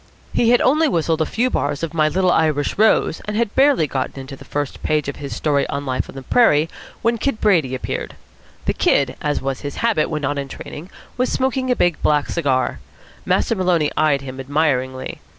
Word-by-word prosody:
He 230 Hz, -, +3 dB
had 245 Hz, 0 st, +5 dB
only 310 Hz, +5 st, +3 dB
whistled 165 Hz, -, 0 dB
a 160 Hz, -, +1 dB
few 250 Hz, +3 st, 0 dB
bars 145 Hz, +2 st, -1 dB
of 165 Hz, -1 st, -3 dB
"My 155 Hz, -2 st, +3 dB
Little 185 Hz, +2 st, +2 dB
Irish 155 Hz, -4 st, +1 dB
Rose," 215 Hz, -6 st, +3 dB
and 210 Hz, 0 st, -3 dB
had 230 Hz, -2 st, 0 dB
barely 270 Hz, -, +4 dB
got 135 Hz, -1 st, -3 dB
into 135 Hz, +1 st, -7 dB
the -, -, -13 dB
first 145 Hz, -2 st, -4 dB
page 150 Hz, -2 st, 0 dB
of 140 Hz, -, -4 dB
his 140 Hz, -2 st, -6 dB
story 145 Hz, -2 st, +1 dB
of 140 Hz, 0 st, -3 dB
life 130 Hz, -2 st, -2 dB
on -, -, -11 dB
the 135 Hz, -, -7 dB
prairie 160 Hz, -, +3 dB, 0.3 s
when 230 Hz, 0 st, +1 dB
Kid 275 Hz, -2 st, -1 dB
Brady 165 Hz, -11 st, +2 dB
appeared. 130 Hz, -, -4 dB, 0.5 s
The -, -, +1 dB
Kid, 135 Hz, -2 st, +2 dB
as 150 Hz, -2 st, -1 dB
was 135 Hz, -1 st, -2 dB
his 145 Hz, -1 st, -5 dB
habit 220 Hz, -10 st, +2 dB
when 150 Hz, -2 st, -3 dB
not 140 Hz, +1 st, -1 dB
in 140 Hz, -, -4 dB
training, 155 Hz, +5 st, -9 dB, 0.3 s
was 255 Hz, +1 st, 0 dB
smoking 260 Hz, 0 st, 0 dB
a 250 Hz, -, +3 dB
big 175 Hz, -7 st, +1 dB
black 150 Hz, -1 st, +2 dB
cigar. 135 Hz, -6 st, 0 dB, 0.5 s
Master -, -, +2 dB
Maloney 180 Hz, -7 st, +1 dB
eyed 150 Hz, -3 st, +2 dB
him 130 Hz, -1 st, -8 dB
admiringly. 130 Hz, -2 st, -1 dB
155 Hz, 205 wpm, -20 LUFS, 140-210 Hz, 0.5 s, had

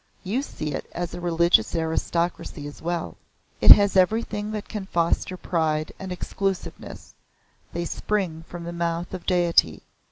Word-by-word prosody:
You 215 Hz, +7 st, -1 dB
see 155 Hz, -, -5 dB
it -, -, -5 dB
is 175 Hz, 0 st, -3 dB
a 175 Hz, -, -6 dB
religious 170 Hz, -7 st, +3 dB
aristocracy 165 Hz, -1 st, -2 dB
as 145 Hz, -, -9 dB
well. 170 Hz, 0 st, -3 dB, 0.4 s
It -, -, +5 dB
has 200 Hz, -1 st, +9 dB
everything 210 Hz, +2 st, +1 dB
that 215 Hz, -1 st, -5 dB
can 205 Hz, -3 st, -5 dB
foster 170 Hz, +1 st, 0 dB
pride 155 Hz, -4 st, -1 dB
and 190 Hz, -1 st, -6 dB
exclusiveness. 195 Hz, +1 st, -4 dB, 0.6 s
They 170 Hz, 0 st, -3 dB
spring 175 Hz, -3 st, -2 dB
from 175 Hz, -1 st, -8 dB
the 170 Hz, 0 st, -5 dB
Mouth 170 Hz, +1 st, -2 dB
of 185 Hz, -, -7 dB
Deity. 170 Hz, -, +3 dB
175 Hz, 150 wpm, -25 LUFS, 165-190 Hz, 0.6 s, has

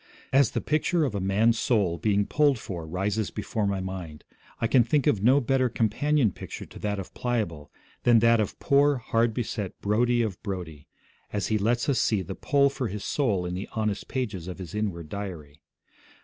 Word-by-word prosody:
As 135 Hz, -4 st, +5 dB
the -, -, -2 dB
picture 155 Hz, +2 st, +1 dB
of 130 Hz, -, -2 dB
a 100 Hz, -, -1 dB
man's 105 Hz, +5 st, +2 dB
soul 100 Hz, -8 st, +1 dB
being 105 Hz, -1 st, +2 dB
pulled 145 Hz, 0 st, +3 dB
for 85 Hz, -7 st, -6 dB
rises 100 Hz, +5 st, -1 dB
before 105 Hz, 0 st, -2 dB
my 100 Hz, -1 st, -1 dB
mind, 95 Hz, -5 st, -6 dB, 0.4 s
I -, -, 0 dB
can 120 Hz, +2 st, +5 dB
think 135 Hz, +4 st, +1 dB
of 100 Hz, -, +2 dB
no 130 Hz, +6 st, +5 dB
better 130 Hz, -1 st, +1 dB
companion 120 Hz, +3 st, +1 dB
picture -, -, -8 dB
to -, -, -13 dB
that 105 Hz, -1 st, -2 dB
of 95 Hz, -, -7 dB
Pliable 105 Hz, -12 st, -2 dB, 0.3 s
than 120 Hz, -1 st, +5 dB
that 115 Hz, 0 st, +5 dB
of 105 Hz, -, -2 dB
poor, 145 Hz, +1 st, +4 dB
hard 115 Hz, 0 st, +1 dB
beset 110 Hz, -5 st, -4 dB
Brodie 120 Hz, +3 st, +2 dB
of 105 Hz, -5 st, -4 dB
Brodie, 85 Hz, -7 st, -6 dB, 0.4 s
as 100 Hz, -2 st, -2 dB
he 110 Hz, -1 st, +1 dB
lets 120 Hz, +4 st, +1 dB
us 140 Hz, -3 st, +2 dB
see 105 Hz, -4 st, +1 dB
the 95 Hz, -, -6 dB
pull 140 Hz, +6 st, +2 dB
for 130 Hz, -3 st, -3 dB
his 105 Hz, 0 st, -5 dB
soul 105 Hz, -11 st, 0 dB
in 90 Hz, -, -3 dB
the 95 Hz, +2 st, -5 dB
honest 110 Hz, -3 st, -2 dB
pages 110 Hz, -10 st, -3 dB
of 90 Hz, -, -6 dB
his 90 Hz, -4 st, -8 dB
inward 100 Hz, -7 st, -3 dB
diary. 80 Hz, -6 st, -7 dB
105 Hz, 195 wpm, -27 LUFS, 95-120 Hz, 0.4 s, As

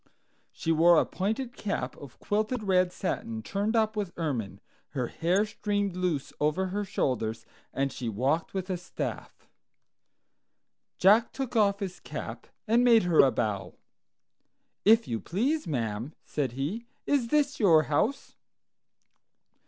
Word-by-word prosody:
She 165 Hz, -, -2 dB
wore 165 Hz, +1 st, +6 dB
a -, -, +2 dB
pointed 230 Hz, +6 st, -3 dB
cap 205 Hz, -1 st, -3 dB
of 140 Hz, -4 st, -12 dB
quilted 215 Hz, +3 st, -1 dB
red 185 Hz, -2 st, +3 dB
satin 220 Hz, +5 st, -3 dB
turned 205 Hz, +2 st, -1 dB
up 220 Hz, -1 st, +2 dB
with 200 Hz, -4 st, -4 dB
ermine, 115 Hz, -, -3 dB, 0.4 s
her 125 Hz, -, +1 dB
hair 180 Hz, +5 st, +1 dB
streamed 205 Hz, -3 st, -2 dB
loose 180 Hz, -6 st, -2 dB
over 155 Hz, +6 st, +1 dB
her 205 Hz, +2 st, -2 dB
shoulders, 115 Hz, -, -2 dB, 0.3 s
and 135 Hz, -1 st, -1 dB
she 120 Hz, -, -4 dB
walked 135 Hz, +10 st, 0 dB
with 190 Hz, 0 st, -3 dB
a 180 Hz, -, -1 dB
staff. 175 Hz, +1 st, -6 dB, 1.5 s
Jack 210 Hz, +5 st, +5 dB
took 265 Hz, -3 st, -5 dB
off 200 Hz, -2 st, +3 dB
his 185 Hz, -2 st, -4 dB
cap -, -, -7 dB, 0.2 s
and 235 Hz, +3 st, +4 dB
made 235 Hz, -3 st, +6 dB
her 175 Hz, -3 st, +2 dB
a 135 Hz, -, +8 dB
bow. 105 Hz, -6 st, -2 dB, 1.1 s
"If 225 Hz, +2 st, +6 dB
you 115 Hz, -, -2 dB
please, 245 Hz, -, -1 dB
ma'am," 115 Hz, -1 st, -3 dB
said 135 Hz, -5 st, -2 dB
he, 170 Hz, -, -3 dB, 0.2 s
"is 275 Hz, -5 st, +1 dB
this 285 Hz, +1 st, +1 dB
your 165 Hz, -8 st, +6 dB
house?" 155 Hz, -, -1 dB
185 Hz, 140 wpm, -28 LUFS, 145-220 Hz, 1.5 s, a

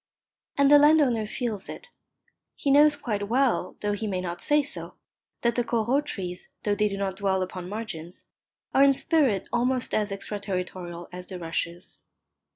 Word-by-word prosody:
And 280 Hz, 0 st, +5 dB
the 290 Hz, -, +9 dB
landowner 285 Hz, -7 st, +4 dB
feels 220 Hz, -3 st, -4 dB
it. -, -, -9 dB, 0.7 s
He 280 Hz, -, 0 dB
knows 295 Hz, +1 st, +6 dB
quite 210 Hz, -7 st, -3 dB
well, 255 Hz, +1 st, +1 dB
though 205 Hz, -, 0 dB
he 205 Hz, +1 st, -2 dB
may 190 Hz, -3 st, -1 dB
not 175 Hz, -1 st, -4 dB
say 295 Hz, 0 st, +3 dB
so, 285 Hz, -, -4 dB, 0.5 s
that 235 Hz, 0 st, +2 dB
the 245 Hz, -, +1 dB
Corot 240 Hz, +5 st, 0 dB
trees, 180 Hz, -5 st, -5 dB
though 205 Hz, -, +1 dB
they 210 Hz, +1 st, +2 dB
do 200 Hz, -1 st, -4 dB
not 195 Hz, -1 st, -2 dB
dwell 190 Hz, -2 st, +1 dB
upon 185 Hz, -1 st, -6 dB
margins, 185 Hz, -6 st, -6 dB, 0.5 s
are 270 Hz, -, +6 dB
in 280 Hz, 0 st, +6 dB
spirit 270 Hz, -, +1 dB
almost 250 Hz, +1 st, 0 dB
as 210 Hz, -1 st, +1 dB
extraterritorial 185 Hz, -3 st, -5 dB
as 180 Hz, 0 st, -7 dB
the 185 Hz, -, -6 dB
rushes. 170 Hz, +1 st, -4 dB
210 Hz, 165 wpm, -26 LUFS, 185-260 Hz, 0.7 s, the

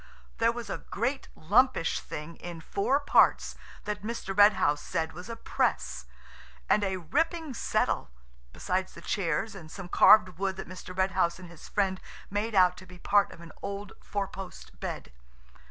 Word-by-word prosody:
There 230 Hz, 0 st, +4 dB
was 235 Hz, -2 st, -6 dB
a -, -, -4 dB
great 255 Hz, +6 st, -3 dB
lumpish 205 Hz, +2 st, +3 dB
thing 150 Hz, +3 st, -7 dB
in 175 Hz, -2 st, -7 dB
four 200 Hz, -, 0 dB
parts 285 Hz, -, +3 dB, 0.3 s
that 210 Hz, -1 st, -3 dB
Mr. 210 Hz, -3 st, -4 dB
Red 205 Hz, +1 st, +8 dB
House 145 Hz, -5 st, +1 dB
said 160 Hz, -2 st, -2 dB
was 180 Hz, +6 st, -9 dB
a 230 Hz, -, -4 dB
press, -, -, -1 dB, 0.6 s
and 210 Hz, -, +3 dB
a 190 Hz, -1 st, 0 dB
ripping 320 Hz, -, -1 dB
settle–besides -, -, -2 dB
the 170 Hz, -, -10 dB
chairs, 180 Hz, +3 st, -1 dB
and 170 Hz, -6 st, -10 dB
some 180 Hz, +1 st, -8 dB
carved 185 Hz, -2 st, +6 dB
wood 195 Hz, -1 st, 0 dB
that -, -, -7 dB
Mr. 185 Hz, 0 st, -9 dB
Red 190 Hz, 0 st, +2 dB
House 170 Hz, -2 st, +1 dB
and 180 Hz, -1 st, -11 dB
his 170 Hz, -, -13 dB
friend 190 Hz, -2 st, 0 dB, 0.3 s
made 210 Hz, +2 st, -1 dB
out 180 Hz, -1 st, +5 dB
to 185 Hz, -, -12 dB
be 180 Hz, 0 st, -12 dB
part 200 Hz, +3 st, +3 dB
of 170 Hz, -, -12 dB
an 165 Hz, -1 st, -11 dB
old 200 Hz, 0 st, -5 dB
four 200 Hz, -1 st, -2 dB
post 190 Hz, -1 st, -10 dB
bed. -, -, -5 dB
190 Hz, 170 wpm, -29 LUFS, 170-210 Hz, 0.6 s, Red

